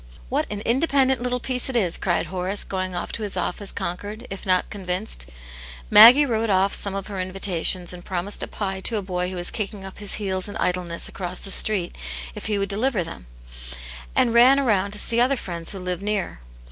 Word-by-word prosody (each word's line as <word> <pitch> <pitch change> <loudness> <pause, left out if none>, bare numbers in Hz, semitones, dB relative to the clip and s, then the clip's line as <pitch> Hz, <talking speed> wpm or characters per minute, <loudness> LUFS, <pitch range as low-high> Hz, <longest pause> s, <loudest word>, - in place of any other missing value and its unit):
"What - - -1
an 205 -1 -4
independent 265 +1 +1
little 250 0 -1
piece 250 +1 0
it 260 - -4
is!" 185 -8 +3
cried 175 -2 0
Horace, 185 +3 -3
going 185 -1 -4
off 175 - -4
to - - -3
his 205 -3 -2
office 190 +2 -2
conquered, 205 +6 -5
if 195 0 -7
not 185 -1 +1
Convinced. 185 - -2 0.6
Maggie 235 +7 +9
wrote 225 -3 -1
off 195 0 +2
some 200 -1 -2
of 195 -1 -4
her 200 -2 -6
invitations, 185 -1 0
and 175 -1 -10
promised 185 +2 -2
a - - -1
pie 195 -2 -4
to 220 +4 -1
a 205 - -3
boy 180 -1 -3
who 185 - -6
was 175 0 0
kicking 200 -2 -5
up 190 - -10
his 205 -1 +2
heels 190 -2 -1
in 205 - -6
idleness 180 -2 -1
across 180 -1 -5
the 195 - -1
street 195 -5 +4 0.4
if - - -8
he 210 -1 0
would 200 0 -1
deliver 210 -1 0
them; 165 - -10 0.9
and 230 - +3
ran 250 +4 +6
round 200 -4 +1
to - - -6
see 230 +2 +3
other 260 +3 +3
friends 170 -6 -4
who 195 - -6
lived 180 0 -4
near. 200 - -3
195 Hz, 210 wpm, -23 LUFS, 180-220 Hz, 0.9 s, Maggie